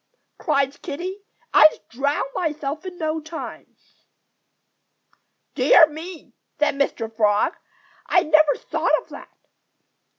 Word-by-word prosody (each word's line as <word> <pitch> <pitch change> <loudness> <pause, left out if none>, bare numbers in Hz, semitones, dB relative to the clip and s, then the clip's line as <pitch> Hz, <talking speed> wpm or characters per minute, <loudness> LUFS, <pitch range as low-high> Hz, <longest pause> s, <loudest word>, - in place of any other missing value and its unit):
cried 280 -3 0
Kiddie. 370 +7 -6 0.3
"I'd 310 - +7
drown 280 +5 -1
myself 310 0 -3
in 360 -1 -8
no 315 -1 -2
time." 320 +1 -9 1.8
"Dear 325 - +6
me!" 320 +2 -10 0.2
said 300 - +2
Mr. 230 -5 -2
Frog. 210 -2 +2 0.5
"I 360 - +3
never 310 -1 +4
thought - - 0
of - - -29
that." - - -11
305 Hz, 105 wpm, -22 LUFS, 280-325 Hz, 1.8 s, I'd